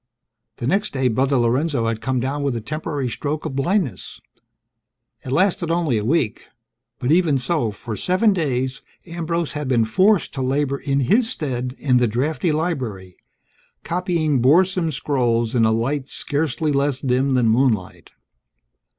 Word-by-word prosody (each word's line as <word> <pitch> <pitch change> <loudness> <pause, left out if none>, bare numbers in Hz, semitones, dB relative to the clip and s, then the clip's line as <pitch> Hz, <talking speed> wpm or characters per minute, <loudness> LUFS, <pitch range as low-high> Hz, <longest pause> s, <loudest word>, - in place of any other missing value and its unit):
The - - -5
next 200 - 0
day, 130 -2 +1
Brother 130 +4 +1
Lorenzo 125 +2 +1
had 115 -1 -2
come 130 +2 -1
down 135 +4 -2
with 140 -3 -1
a - - -2
temporary 145 +2 -3
stroke 145 +5 -3
of 135 - -4
blindness 145 - -1 1.0
it 130 - -6
lasted 170 +2 +1
only 165 -9 +1
a - - -4
week; 125 -2 0 0.5
but 125 +3 -1
even 165 -4 +3
so, 130 -2 -1
for 110 +2 -6
seven 185 - +2
days 130 -6 -1 0.2
Ambrose 170 -1 -3
had 150 -2 -4
been 120 -3 +2
forced 185 - +2
to 135 - -4
labor 140 +1 0
in 140 0 0
his 225 - +2
stead 130 - -3
in 130 -3 +2
the 125 -1 +3
drafty 140 - 0
library, 130 - -3 0.7
copying 170 -6 0
boresome 175 +5 +3
scrolls 120 -5 0
in 115 -3 +3
a 110 - +3
light 130 +5 -1
scarcely 150 +1 -1
less 140 -1 0
dim 130 0 +1
than 125 -2 +3
moonlight. 110 -5 0
135 Hz, 155 wpm, -21 LUFS, 125-160 Hz, 1.0 s, even